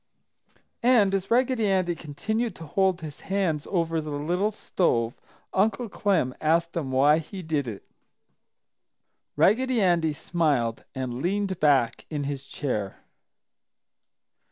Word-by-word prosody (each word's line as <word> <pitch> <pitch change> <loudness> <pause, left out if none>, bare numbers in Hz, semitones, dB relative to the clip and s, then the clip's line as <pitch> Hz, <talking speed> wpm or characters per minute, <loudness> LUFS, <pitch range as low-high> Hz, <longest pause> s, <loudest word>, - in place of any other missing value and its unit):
And 230 -5 +4
as 195 -1 -1
Raggedy 245 -2 +2
Andy 185 -2 +1
continued 215 +8 -3
to 165 - -9
hold 190 +3 +1
his 155 -2 -8
hands 185 -7 -1
over 165 -3 0
the 155 - -7
little 170 +8 0
stove, 120 - -1 0.3
Uncle 215 +4 +1
Clem 185 -12 +1
asked 165 +2 +1
him 155 -6 -2
why 140 +4 +4
he 185 +4 -8
did 150 -5 -1
it. 105 -4 -7 1.5
Raggedy 255 +3 +3
Andy 170 -5 +2
smiled 145 -8 0
and 130 -1 -4
leaned 195 +1 -1
back 135 -6 +2
in 150 -2 -3
his 140 -1 -4
chair. 110 -9 -4
165 Hz, 125 wpm, -26 LUFS, 145-195 Hz, 1.5 s, And